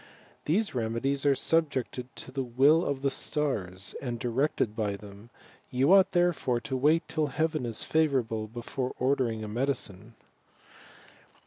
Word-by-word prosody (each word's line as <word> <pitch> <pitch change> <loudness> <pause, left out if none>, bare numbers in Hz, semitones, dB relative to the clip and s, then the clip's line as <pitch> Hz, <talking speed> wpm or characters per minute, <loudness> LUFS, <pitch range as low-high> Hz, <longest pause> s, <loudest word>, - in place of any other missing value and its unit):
"The 160 +5 +2
temedies 135 - -1
are 140 - +5
subjected 130 -6 -1
to - - -7
the 135 - -2
will 135 +7 +4
of 140 -3 -2
the 140 - +2
stars, 100 -13 -1
and 120 -4 -3
directed 125 -2 0
by 105 -3 -1
them; 100 +2 -13 0.4
you 135 +8 +3
ought 195 0 +5
therefore 175 -9 +2
to 115 +4 -4
wait 150 +5 +2
till 155 -2 0
heaven 155 -2 -1
is 115 -2 -3
favourable, 130 -9 0
before 120 +3 -5
ordering 125 -4 0
a - - -5
medicine." 115 -3 -3
130 Hz, 140 wpm, -28 LUFS, 115-150 Hz, 0.4 s, are